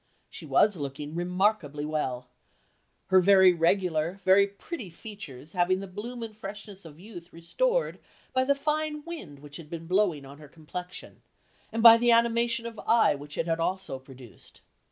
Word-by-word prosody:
She - - -10
was 210 -3 +3
looking 145 +1 -6
remarkably 175 -4 0
well; 130 -5 -3 0.8
her 190 0 +6
very 190 -1 +6
regular, 170 0 0
very 195 +1 +5
pretty 200 - -8
features 165 - -11
having 185 0 +1
the 195 - -6
bloom 225 +6 -7
and 220 -2 -8
freshness 200 -2 -9
of 155 -1 -13
youth 180 -3 -12
restored - - -1 0.3
by 260 0 +2
the 280 +1 +2
fine 300 +1 -2
wind 255 - -8
which 145 0 -10
had 160 -3 -12
been 165 0 -7
blowing 180 -5 +1
on 140 +2 -13
her 150 - -12
complexion, 170 +4 -9 0.5
and 225 0 -2
by 230 -1 +10
the 240 +1 +1
animation 235 0 +2
of 230 -2 -7
eye 230 0 +4
which 145 +1 -9
it - - 0
had 165 -1 -1
also 180 -5 -3
produced. 130 -3 -16
185 Hz, 165 wpm, -27 LUFS, 155-225 Hz, 0.8 s, by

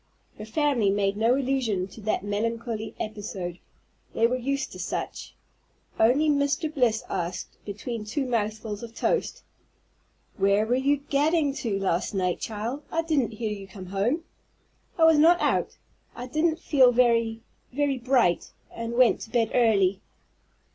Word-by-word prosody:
Her 215 - -6
family 255 -3 +1
made 200 0 +1
no 225 +4 +3
allusion 250 -8 0
to 220 - -12
that 210 -2 -1
melancholy 225 +2 -3
episode, 195 -5 -5 0.6
they 225 - +3
were 245 +2 +2
used 275 +3 -2
to - - -10
such, - - -5 0.6
only 260 +8 +4
Mr. 290 +2 +1
Bliss 245 -6 +1
asked, 175 -1 -4
between 210 +2 -5
two 255 +7 -2
mouthfuls 215 -3 -2
of 230 -1 -9
toast, - - -1 0.9
"Where 200 +2 +3
were 235 - 0
you 275 +3 +2
gadding 290 +1 +1
to 215 -5 -2
last 190 0 -1
night, 180 -2 0
child? 225 +6 -4
I 330 0 0
didn't 285 -8 0
hear 215 0 -3
you 200 -2 -6
come 190 -1 -10
home." 205 - -1 0.7
"I 330 - +3
was 320 -2 +6
not 340 +3 +6
out. - - 0 0.4
I 245 - -6
didn't 310 +5 0
feel 270 -6 +4
very 230 -2 +2 0.3
very 275 0 0
bright, 240 -8 +2 0.2
and 230 0 -5
went 245 0 +4
to - - -8
bed 230 -2 +1
early." 200 -5 +3
230 Hz, 150 wpm, -26 LUFS, 210-275 Hz, 0.9 s, was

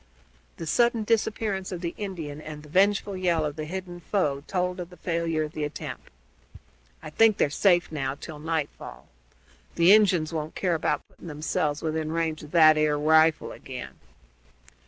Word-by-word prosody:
The 165 - -6
sudden 235 +6 +2
disappearance 210 -3 -1
of 180 -2 -5
the 170 -1 -3
Indian 165 -8 -6
and 150 -1 -9
the 150 - -14
vengeful 200 +3 +2
yell 175 -4 +1
of 150 -1 -4
the 155 - -5
hidden 180 +1 -6
foe 150 -6 -1
told 180 0 -1
of 175 -1 -6
the 180 - -15
failure 165 -2 -1
of 150 - -5
the 155 - -4
attempt. 150 0 -6 0.9
"I - - -8
think 220 +5 +4
they're 145 - +2
safe, 175 +1 +3
now, 135 -3 -2
till 155 +1 -9
nightfall. 155 - -5 0.7
The 170 +4 +6
Injuns 180 -7 +3
won't 155 -1 -4
care 180 -3 0
about 155 -2 -1
putting - - -14
themselves 150 -1 -2
within 155 -1 -2
range 160 -1 -1
of 150 - -11
that 155 -2 +6
'ere 150 -1 +2
rifle 160 +1 +3
again." - - -9
165 Hz, 170 wpm, -26 LUFS, 155-185 Hz, 0.9 s, The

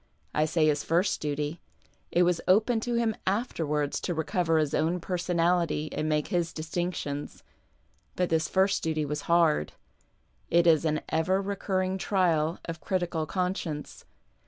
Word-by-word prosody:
I 150 - +2
say 160 0 +2
his 150 -1 +2
first 175 +5 +1
duty; 150 +2 -3 0.5
it 175 - +3
was 175 -1 +1
open 220 +5 +4
to 240 +2 -2
him 230 -2 +1
afterwards 155 - -1
to 175 - -2
recover 160 +1 +1
his 155 -2 +1
own 165 +3 +1
personality 170 -3 0
and 155 - -1
make 150 -1 0
his 170 -2 0
distinctions. 160 -3 -4 0.7
But 180 -2 0
tliis 160 -1 +1
first 190 +1 +2
duty 155 -2 -1
was 150 +2 -5
hard. 165 - +3 0.8
It 170 0 +4
is 165 -1 +4
an 155 -1 +1
ever 170 +4 +1
recurring 190 -1 -1
trial 170 -5 +1
of 165 -1 -6
critical 175 -4 -1
conscience. 180 -5 -3
170 Hz, 145 wpm, -28 LUFS, 155-185 Hz, 0.8 s, open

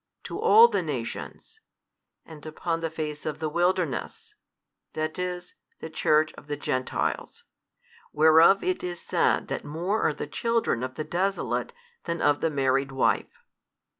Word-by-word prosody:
to - - -6
all 455 +2 +8
the - - 0
nations, 440 - -6 0.7
and 155 -2 -12
upon 165 +1 -3
the 165 0 -2
face 155 -2 -5
of 155 - -3
the 160 - -2
wilderness, 190 - -1 0.6
that 155 +2 -3
is 180 0 -4 0.3
the 160 - -8
Church 155 0 +2
of - - -14
the 145 0 -3
Gentiles, 130 -2 -2 0.7
whereof 160 +5 +6
it 370 0 -1
is 175 -1 -4
said - - +1
that - - -3
more 175 +9 -2
are 155 - +2
the - - -4
children 230 - 0
of 130 0 -4
the 155 - -3
desolate 190 +5 -1 0.3
than 170 0 -2
of 145 0 +2
the 165 - +2
married 135 -1 +1
wife. 135 - 0
160 Hz, 150 wpm, -26 LUFS, 150-180 Hz, 0.7 s, all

